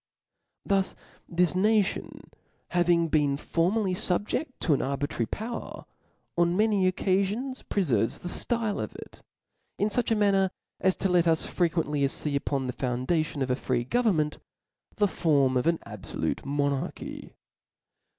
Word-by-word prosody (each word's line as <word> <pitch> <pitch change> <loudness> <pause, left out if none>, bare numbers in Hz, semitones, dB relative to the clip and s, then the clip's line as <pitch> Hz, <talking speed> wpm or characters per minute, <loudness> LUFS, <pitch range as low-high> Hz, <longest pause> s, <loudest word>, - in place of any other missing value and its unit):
Thus 195 -2 +1 0.3
this 175 0 +2
nation 205 +1 0 0.4
having 175 -1 +3
been 145 -3 +2
formerly 185 +6 0
fubjecl: 205 - 0
to 160 - +3
an 140 - +1
arbitrary 135 -4 -2
power, 230 - -6 0.5
on 175 +1 +2
many 205 -4 +3
occafions 200 +8 -1
preferves 125 - 0
the - - -5
flile 225 +2 -1
of - - -5
it, - - -11 0.6
in 205 - +1
fuch 240 +2 0
a 225 - +3
manqer, 195 -2 +3 0.3
as 190 0 +3
to - - 0
let 175 -1 +3
us 160 -1 +2
fre 175 - +1
quently 155 -3 -1
fee 145 +1 -2
upon 140 -1 -1
the 125 - -3
foundation 135 +5 -1
of 130 - -1
a - - +3
free 125 -2 -1
govern 220 - +2
ment, 150 -1 0 0.6
the 205 - +3
form 140 -8 +2
of 125 +4 +1
an 170 0 +3
abfolute - - -2
monarchy. 140 -1 -3
175 Hz, 145 wpm, -27 LUFS, 145-200 Hz, 0.6 s, having